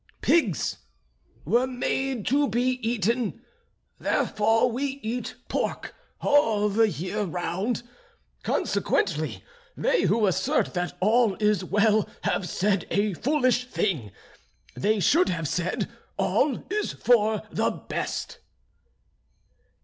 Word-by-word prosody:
Pigs 250 - +2 0.7
were 240 - +2
made 260 -2 -2
to 285 +1 +2
be 250 +3 0
eaten 230 0 -1 0.6
therefore 225 +3 +2
we 270 +3 -3
eat 235 +3 -3
pork - - -2 0.3
all 225 -8 +3
the 220 +2 +3
year 190 +3 -3
round. 190 +5 -2 0.6
Consequently - - 0 0.3
they - - +2
who 225 -2 +3
assert 185 - +1
that 180 -1 -3
all 220 0 +3
is 210 -1 +1
well 210 +3 +2
have 180 - -1
said 195 -2 0
a 205 0 +1
foolish 255 - +1
thing, 155 - -1 0.6
they 215 +2 +1
should 315 - +4
have 165 -3 -2
said 180 +4 -1 0.3
all 275 -5 +1
is 425 0 -1
for 220 -3 +2
the - - +1
best." - - -4
220 Hz, 110 wpm, -26 LUFS, 200-250 Hz, 0.7 s, should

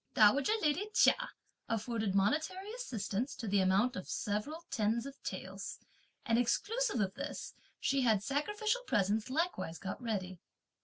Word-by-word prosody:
Dowager 270 - +6
lady 315 +8 +1
Chia - - +7 0.6
afforded 225 -3 -1
monetary 315 - +1
assistance 245 - -3
to 230 - -5
the 200 0 +3
amount 195 +7 +3
of 185 - -6
several 220 +11 -2
tens 225 +2 +1
of 275 0 -9
taels; - - -5 0.5
and 230 0 +3
exclusive 440 - +1
of 195 -2 +1
this, 285 +5 -5 0.3
she 275 -1 +2
had 220 -5 +3
sacrificial 420 - 0
presents 210 +1 +1
likewise 285 - -1
got 190 - -5
ready. 190 -6 -3
235 Hz, 140 wpm, -34 LUFS, 205-300 Hz, 0.6 s, Chia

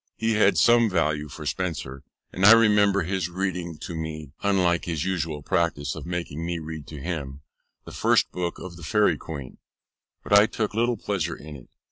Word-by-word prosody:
He 115 0 0
had 105 -4 +3
some 120 +6 +5
value 75 -5 0
for 75 +1 -9
Spenser, 75 -6 -3 0.3
and 95 - -3
I 105 +3 +10
remember 105 -4 +4
his 90 -1 -2
reading 90 -3 -3
to - - -6
me 80 -3 -6
(unlike 90 -4 +2
his 80 -2 -2
usual 80 -5 -2
practice 80 -3 0
of - - -8
making 85 -3 -4
me 85 0 -2
read 80 -2 -7
to 75 - -8
him) 70 -3 -5 0.4
the - - -9
first - - +2
book 90 -1 -3
of 85 -2 -9
the 85 - -11
Fairie 95 -3 +2
Queene; 70 -6 -8 0.6
but - - -2
I 105 +1 +7
took 110 -2 -3
little 120 +2 +1
pleasure 90 -6 -2
in 75 0 -10
it. 65 - -13
85 Hz, 185 wpm, -25 LUFS, 80-100 Hz, 0.6 s, I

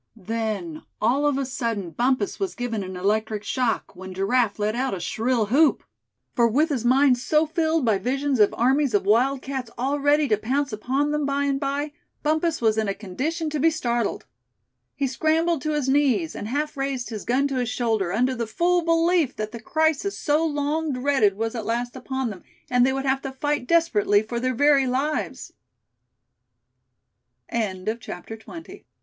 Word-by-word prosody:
Then, 210 -6 -4 0.2
all 265 +7 +2
of 285 -2 +1
a 275 - -1
sudden, 230 -8 -3
Bumpus 245 0 0
was 390 -2 -2
given 240 -4 -3
an 185 -1 -6
electric 215 +2 0
shock, 245 -4 -1
when 185 +1 -9
Giraffe 205 +3 +1
let 210 +1 -1
out 260 -3 -1
a - - -6
shrill 225 +6 0
whoop; 290 +5 +4 0.5
for 235 -2 +4
with 295 +8 +2
his 265 -6 -1
mind 255 +1 +4
so 305 +5 +2
filled 320 -2 0
by 215 -4 +2
visions 270 +2 -1
of 210 - +5
armies 265 0 +2
of 200 - +1
wildcats 260 +3 +1
all 275 +4 -1
ready 290 +1 +3
to 215 - +3
pounce 265 +4 -1
upon 265 +7 0
them 300 -1 0
by 280 0 0
and 275 -1 0
by, 285 +1 -2 0.3
Bumpus 315 +1 +1
was 220 -1 +3
in 215 - 0
a 195 - -1
condition 285 - -3
to 300 - -2
be 325 +4 +5
startled. 240 -8 -2 0.7
He 280 - -1
scrambled 315 +4 +1
to 305 +3 -1
his 295 -3 -1
knees, 265 - +2
and 210 - -5
half 300 +5 -2
raised 270 -3 -3
his 215 -2 -5
gun 265 +4 +1
to 270 - -2
his 245 -2 -1
shoulder, 220 -8 0
under 250 +6 +1
the 235 -2 -3
full 350 +10 +2
belief 330 -3 +2
that 215 0 -4
the 235 - -7
crisis 315 - 0
so 300 +1 +1
long 300 0 -1
dreaded 250 -6 +2
was 225 +1 -2
at 230 -3 -4
last 240 +3 -2
upon 265 -3 -3
them, 190 - -10 0.3
and 250 -1 +4
they - - +2
would 270 +1 -2
have 270 0 +1
to 270 - -5
fight 290 -1 -2
desperately 215 -11 +3
for 235 +2 -4
their 255 +1 -1
very 285 0 +4
lives. 275 +5 -2 2.0
CHAPTER 215 -2 -2
XXI. 220 -6 -9
THE 225 0 -9
LITTL 330 -2 -10
255 Hz, 185 wpm, -24 LUFS, 220-290 Hz, 2.0 s, of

